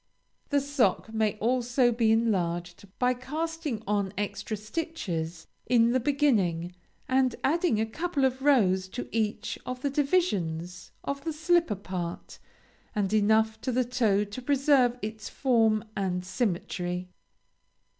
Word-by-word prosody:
The 285 - +3
sock 270 -5 +1
may 220 -2 +1
also 245 +2 +2
be 225 -1 +2
enlarged 180 -5 0
by 250 0 +2
casting 300 -1 -4
on 200 -1 0
extra 205 +1 -3
stitches 200 - -4 0.2
in 235 -1 +4
the 255 - +2
beginning, 215 - +1 0.3
and 260 -1 +2
adding 320 -5 +2
a 220 - +2
couple 295 +4 -1
of 260 0 0
rows 195 -10 +3
to 250 - -4
each 220 0 -2
of 255 0 -6
the 280 - 0
divisions 190 - 0
of 280 0 -4
the 325 - -2
slipper 325 -5 +2
part, 180 -3 -6 0.6
and 205 -1 0
enough 220 +1 +3
to 255 - -1
the 250 +1 +1
toe 225 -5 +2
to 205 +5 -7
preserve 265 -2 +3
its 215 0 -5
form 225 -5 +2
and 185 -2 -1
symmetry. 180 -3 -2
225 Hz, 135 wpm, -28 LUFS, 200-265 Hz, 0.6 s, in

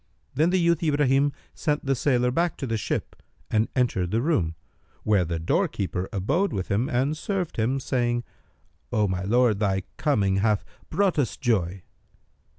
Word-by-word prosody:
Then 155 +6 +3
the 185 +1 +2
youth 170 -1 +2
Ibrahim 145 -3 +3 0.2
sent 150 -2 -1
the 135 - +2
sailor 125 -2 +2
back 170 +4 0
to - - -4
the 115 -3 -1
ship 105 - -3 0.3
and 110 +1 +2
entered 115 -9 +1
the 110 - +1
room, 90 - +1 0.5
where 105 -4 +3
the 85 0 -2
doorkeeper 95 - -1
abode 140 - 0
with 95 -2 -3
him 105 +6 +1
and 130 +5 +1
served 185 +1 -3
him, 120 +5 +1
saying, 120 -2 0 0.7
"O 105 -1 +2
my 90 -1 -2
lord, 110 +1 +2
thy 95 -3 +1
coming 100 -10 +2
hath 105 +1 +1 0.2
brought 190 -1 +1
us 130 - 0
joy!" 95 -7 0
120 Hz, 160 wpm, -25 LUFS, 100-145 Hz, 0.7 s, Then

